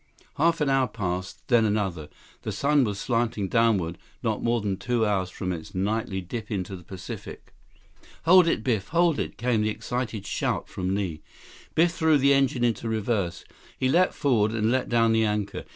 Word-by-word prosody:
Half 165 Hz, +1 st, +2 dB
an 145 Hz, -, +2 dB
hour 135 Hz, -1 st, +3 dB
passed; 95 Hz, -4 st, -4 dB
then 120 Hz, -4 st, +4 dB
another. 95 Hz, -8 st, -1 dB, 0.3 s
The -, -, -4 dB
sun 145 Hz, 0 st, +2 dB
was 105 Hz, -2 st, -3 dB
slanting 115 Hz, -3 st, -1 dB
downward, 100 Hz, -7 st, +1 dB, 0.2 s
not 110 Hz, -3 st, -1 dB
more 120 Hz, 0 st, +1 dB
than 100 Hz, -3 st, -2 dB
two 120 Hz, +1 st, 0 dB
hours 95 Hz, -3 st, 0 dB
from 95 Hz, 0 st, -4 dB
its 80 Hz, +1 st, -8 dB
nightly 100 Hz, 0 st, -1 dB
dip 105 Hz, +4 st, -6 dB
into 95 Hz, -2 st, -3 dB
the 90 Hz, -, -10 dB
Pacific. 95 Hz, +1 st, -9 dB, 0.7 s
"Hold 180 Hz, +1 st, +7 dB
it, 110 Hz, -, +1 dB
Biff! 110 Hz, -6 st, 0 dB
Hold 170 Hz, -2 st, +2 dB
it!" -, -, -4 dB
came 120 Hz, -2 st, +1 dB
the 105 Hz, -, +1 dB
excited 115 Hz, -2 st, -4 dB
shout -, -, -2 dB
from 95 Hz, +1 st, -2 dB
Li. 90 Hz, -6 st, -3 dB, 0.5 s
Biff 170 Hz, +2 st, +4 dB
threw 160 Hz, -3 st, +3 dB
the 140 Hz, 0 st, +4 dB
engine 135 Hz, -3 st, +2 dB
into 115 Hz, -1 st, 0 dB
reverse. 110 Hz, -5 st, -1 dB, 0.3 s
He 130 Hz, -, +1 dB
leaped 180 Hz, +6 st, +3 dB
forward 110 Hz, -6 st, +2 dB
and 110 Hz, 0 st, +1 dB
let 130 Hz, 0 st, 0 dB
down 115 Hz, -1 st, +3 dB
the 115 Hz, 0 st, +3 dB
anchor. 105 Hz, -1 st, -2 dB
110 Hz, 185 wpm, -26 LUFS, 100-130 Hz, 0.7 s, Hold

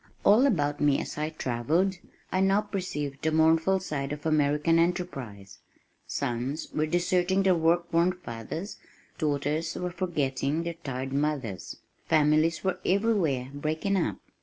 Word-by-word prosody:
All 225 Hz, +7 st, +6 dB
about 145 Hz, -, 0 dB
me 145 Hz, -2 st, +3 dB
as -, -, -5 dB
I 155 Hz, +1 st, -1 dB
travelled, 160 Hz, +7 st, 0 dB, 0.3 s
I 185 Hz, -, +1 dB
now 195 Hz, +2 st, +3 dB
perceived 165 Hz, -9 st, -4 dB
the 160 Hz, -, +1 dB
mournful 160 Hz, +4 st, +3 dB
side 145 Hz, -6 st, -4 dB
of 150 Hz, +1 st, -6 dB
American 155 Hz, +1 st, +3 dB
"enterprise." 140 Hz, -, -3 dB, 0.5 s
Sons 125 Hz, +6 st, -3 dB
were 155 Hz, 0 st, 0 dB
deserting 180 Hz, +3 st, +1 dB
their 190 Hz, -1 st, +4 dB
work 170 Hz, +1 st, +1 dB
worn 170 Hz, +2 st, +3 dB
fathers, 160 Hz, -, -7 dB, 0.4 s
daughters 150 Hz, +1 st, -1 dB
were 180 Hz, 0 st, -3 dB
forgetting 155 Hz, -4 st, -1 dB
their 170 Hz, 0 st, -3 dB
tired 135 Hz, -5 st, -5 dB
mothers. 140 Hz, -, -2 dB, 0.3 s
Families 155 Hz, +1 st, +3 dB
were 185 Hz, -1 st, -1 dB
everywhere 180 Hz, -, +1 dB
breaking 155 Hz, +7 st, -1 dB
up. 110 Hz, -, 0 dB
160 Hz, 135 wpm, -28 LUFS, 145-180 Hz, 0.5 s, All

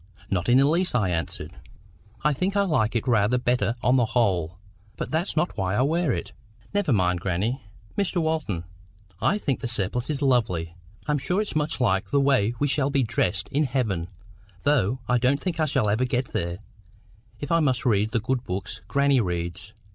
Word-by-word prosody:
"Not 90 Hz, 0 st, 0 dB
in 125 Hz, -, +6 dB
the 135 Hz, -, +5 dB
least," 170 Hz, 0 st, +1 dB
I 100 Hz, -7 st, +2 dB
answered. 80 Hz, -2 st, -4 dB, 0.7 s
"I 150 Hz, +1 st, +3 dB
think 185 Hz, +8 st, -1 dB
I 200 Hz, -, +4 dB
like 120 Hz, -, +1 dB
it 115 Hz, +3 st, -1 dB
rather 115 Hz, 0 st, +3 dB
better 120 Hz, -3 st, +1 dB
on 125 Hz, +2 st, +4 dB
the 120 Hz, -, +3 dB
whole. 90 Hz, -7 st, +1 dB, 0.4 s
But -, -, -4 dB
that's 165 Hz, +2 st, -1 dB
not 175 Hz, +3 st, +1 dB
why 95 Hz, -1 st, -1 dB
I 125 Hz, -, +3 dB
wear 160 Hz, +1 st, +1 dB
it." -, -, -3 dB, 0.4 s
"Never 205 Hz, -7 st, +1 dB
mind 90 Hz, -5 st, +2 dB
grannie, 100 Hz, +9 st, -1 dB, 0.3 s
Mr. 200 Hz, -3 st, 0 dB
Walton. 155 Hz, -, -1 dB, 0.6 s
I 205 Hz, -, +2 dB
think 140 Hz, -10 st, -1 dB
the 125 Hz, -, -3 dB
surplice 120 Hz, +3 st, -1 dB
is 145 Hz, -2 st, -1 dB
lovely. 105 Hz, -11 st, +1 dB, 0.3 s
I'm 150 Hz, -1 st, +1 dB
sure 180 Hz, +9 st, 0 dB
it's 210 Hz, -5 st, -3 dB
much 155 Hz, 0 st, -1 dB
liker 95 Hz, -6 st, +1 dB
the 140 Hz, -, +2 dB
way 130 Hz, -5 st, +2 dB
we 145 Hz, -, +1 dB
shall 140 Hz, -1 st, +1 dB
be 140 Hz, -2 st, +2 dB
dressed 100 Hz, -4 st, -1 dB
in 145 Hz, +2 st, +1 dB
heaven, 110 Hz, -10 st, -1 dB, 0.6 s
though 130 Hz, -5 st, +2 dB
I 125 Hz, 0 st, +3 dB
don't 130 Hz, +4 st, +2 dB
think 170 Hz, -1 st, -3 dB
I 155 Hz, -, +3 dB
shall 135 Hz, -6 st, +1 dB
ever 110 Hz, +5 st, +2 dB
get 125 Hz, 0 st, -2 dB
there, 85 Hz, 0 st, -2 dB, 0.8 s
if 145 Hz, -, -5 dB
I 165 Hz, -, +4 dB
must 130 Hz, -5 st, +1 dB
read 105 Hz, -3 st, +2 dB
the 115 Hz, +1 st, 0 dB
good 125 Hz, +3 st, -1 dB
books 95 Hz, +1 st, -5 dB
grannie 140 Hz, -2 st, +3 dB
reads." 85 Hz, +1 st, -4 dB
125 Hz, 195 wpm, -25 LUFS, 100-145 Hz, 0.8 s, in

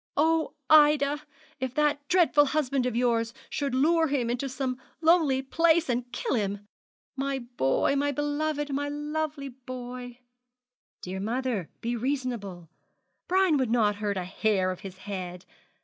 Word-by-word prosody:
'Oh, 320 Hz, +2 st, +2 dB
Ida, 295 Hz, -1 st, +5 dB, 0.4 s
if 260 Hz, -1 st, -3 dB
that 295 Hz, -1 st, +1 dB
dreadful 345 Hz, -5 st, +4 dB
husband 275 Hz, -3 st, 0 dB
of 245 Hz, -, -2 dB
yours 235 Hz, -1 st, +1 dB, 0.2 s
should 280 Hz, -3 st, -1 dB
lure 325 Hz, +4 st, +3 dB
him 260 Hz, -5 st, 0 dB
into 250 Hz, +3 st, -2 dB
some 255 Hz, -1 st, -3 dB, 0.2 s
lonely 320 Hz, -5 st, +3 dB
place, 330 Hz, +2 st, +3 dB
and 245 Hz, 0 st, -1 dB
kill 250 Hz, -, -2 dB
him! 205 Hz, -3 st, -2 dB, 0.5 s
My 275 Hz, 0 st, -1 dB
boy, 240 Hz, -, 0 dB
my 285 Hz, +1 st, +1 dB
beloved, 290 Hz, 0 st, -1 dB
my 285 Hz, +1 st, -1 dB
lovely 295 Hz, -1 st, -3 dB
boy!' 250 Hz, -1 st, -8 dB, 0.9 s
'Dear 185 Hz, +1 st, -4 dB
mother, 230 Hz, -3 st, -2 dB
be 235 Hz, +1 st, -1 dB
reasonable. 235 Hz, -9 st, -3 dB, 0.6 s
Brian 370 Hz, -4 st, +3 dB
would 260 Hz, -4 st, 0 dB
not 215 Hz, -3 st, +2 dB
hurt 205 Hz, -1 st, -2 dB
a 185 Hz, -, -2 dB
hair 185 Hz, 0 st, 0 dB
of 185 Hz, -, -6 dB
his 190 Hz, -1 st, -9 dB
head. 185 Hz, -2 st, -6 dB
260 Hz, 145 wpm, -27 LUFS, 230-295 Hz, 0.9 s, Ida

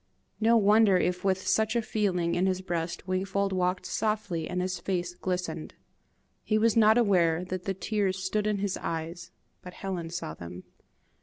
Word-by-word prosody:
No 230 Hz, +1 st, +5 dB
wonder 210 Hz, -2 st, +5 dB
if 180 Hz, 0 st, 0 dB
with 190 Hz, -1 st, 0 dB
such 220 Hz, +1 st, +2 dB
a 235 Hz, -, +3 dB
feeling 180 Hz, -6 st, 0 dB
in 185 Hz, +2 st, +2 dB
his 185 Hz, 0 st, 0 dB
breast 170 Hz, -1 st, -3 dB
Wingfold 190 Hz, +1 st, 0 dB
walked 180 Hz, 0 st, 0 dB
softly, 210 Hz, -7 st, -2 dB
and 180 Hz, -, -2 dB
his 180 Hz, 0 st, -2 dB
face 180 Hz, -1 st, -2 dB
glistened! 180 Hz, -3 st, -4 dB, 0.7 s
He 215 Hz, -, +1 dB
was 225 Hz, 0 st, +3 dB
not 220 Hz, 0 st, +6 dB
aware 180 Hz, -6 st, +3 dB
that 180 Hz, 0 st, -5 dB
the 195 Hz, -, -1 dB
tears 195 Hz, -1 st, -1 dB
stood 205 Hz, +3 st, -1 dB
in 210 Hz, -1 st, +1 dB
his 200 Hz, -1 st, -1 dB
eyes, 165 Hz, +1 st, -5 dB, 0.3 s
but 180 Hz, -1 st, -10 dB
Helen 180 Hz, -4 st, -4 dB
saw 165 Hz, -, -5 dB
them. 85 Hz, +2 st, -9 dB
185 Hz, 170 wpm, -28 LUFS, 175-205 Hz, 0.7 s, not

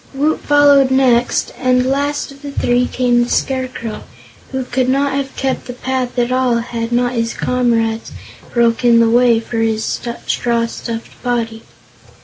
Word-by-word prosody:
Woot 300 Hz, +3 st, +1 dB
followed 285 Hz, -2 st, +5 dB
next, 255 Hz, -2 st, +2 dB
and 255 Hz, 0 st, +2 dB
last 285 Hz, +2 st, -1 dB
of 275 Hz, 0 st, -15 dB
the 285 Hz, -1 st, -7 dB
three 245 Hz, -2 st, +1 dB
came 245 Hz, -1 st, +2 dB
the 240 Hz, -, -4 dB
Scarecrow, 255 Hz, -4 st, -2 dB, 0.5 s
who 265 Hz, -1 st, -2 dB
could 255 Hz, +1 st, 0 dB
not 275 Hz, +1 st, +1 dB
have 275 Hz, -1 st, -3 dB
kept 265 Hz, -2 st, -2 dB
the 245 Hz, -, -5 dB
path 255 Hz, 0 st, -3 dB
at 240 Hz, 0 st, +1 dB
all 255 Hz, -1 st, +2 dB
had 235 Hz, 0 st, -3 dB
not 245 Hz, +1 st, +1 dB
his 230 Hz, -1 st, -2 dB
comrades 230 Hz, -3 st, 0 dB, 0.4 s
broken 235 Hz, 0 st, +3 dB
the 230 Hz, -1 st, +3 dB
way 240 Hz, -1 st, +4 dB
for 230 Hz, +1 st, -6 dB
his 220 Hz, -1 st, 0 dB
straw 235 Hz, 0 st, -2 dB
stuffed 230 Hz, 0 st, -7 dB
body. 230 Hz, -2 st, -2 dB
245 Hz, 155 wpm, -17 LUFS, 235-265 Hz, 0.5 s, followed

